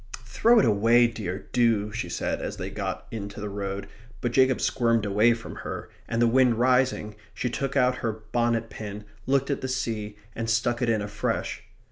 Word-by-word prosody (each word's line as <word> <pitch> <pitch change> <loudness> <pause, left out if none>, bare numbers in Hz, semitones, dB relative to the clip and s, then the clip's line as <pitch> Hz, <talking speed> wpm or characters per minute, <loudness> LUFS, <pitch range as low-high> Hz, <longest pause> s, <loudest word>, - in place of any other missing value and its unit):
"Throw 230 - +4
it - - +5
away, 115 +2 +5
dear, 105 -5 -4
do," 115 -4 +2
she 110 +3 -4
said, - - -2
as - - -4
they - - -5
got - - -4
into 100 -2 -6
the 105 0 -4
road; 100 0 -4 0.3
but 120 - -1
Jacob 130 +1 +4
squirmed 115 -3 +1
away 105 +4 +4
from 115 - -9
her; - - -6 0.2
and 115 - -1
the 120 - +5
wind 125 0 +4
rising, 125 -3 +2 0.2
she 125 - -2
took 135 +2 -2
out 125 -1 +3
her 115 - -1 0.2
bonnet 115 -1 +1
pin, 105 -1 -7 0.2
looked 135 +1 +2
at 140 - -2
the 130 - -2
sea, 110 -5 -3 0.2
and 115 0 -3
stuck 120 +2 +1
it 120 - +1
in 110 -2 +1
afresh. 105 - -2
115 Hz, 190 wpm, -26 LUFS, 105-125 Hz, 0.3 s, it